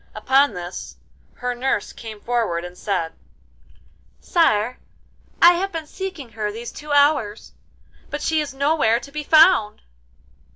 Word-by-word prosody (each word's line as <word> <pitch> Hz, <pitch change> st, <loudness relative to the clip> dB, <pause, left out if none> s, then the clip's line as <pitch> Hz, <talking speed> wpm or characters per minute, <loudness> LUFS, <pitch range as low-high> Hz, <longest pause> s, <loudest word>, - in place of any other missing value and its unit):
Upon 265 Hz, +2 st, +3 dB
this 175 Hz, 0 st, -7 dB, 0.4 s
her 245 Hz, 0 st, -3 dB
nurse 245 Hz, -4 st, -2 dB
came 220 Hz, -2 st, -9 dB
forward 220 Hz, -8 st, -1 dB
and 180 Hz, 0 st, -9 dB
said: 180 Hz, -4 st, -2 dB, 1.1 s
'Sire, 250 Hz, -8 st, +1 dB, 0.6 s
I 345 Hz, +1 st, +8 dB
have 385 Hz, +3 st, -2 dB
been 325 Hz, -2 st, -5 dB
seeking 370 Hz, -6 st, -7 dB
her 215 Hz, -1 st, -3 dB
these 230 Hz, +3 st, -7 dB
two 300 Hz, 0 st, -9 dB
hours, 285 Hz, -7 st, +2 dB, 0.6 s
but -, -, -5 dB
she 320 Hz, -1 st, +1 dB
is 295 Hz, -, -5 dB
nowhere 275 Hz, -4 st, +2 dB
to 280 Hz, +3 st, -12 dB
be 300 Hz, +1 st, -4 dB
found. 310 Hz, -, +4 dB
250 Hz, 135 wpm, -22 LUFS, 210-300 Hz, 1.1 s, I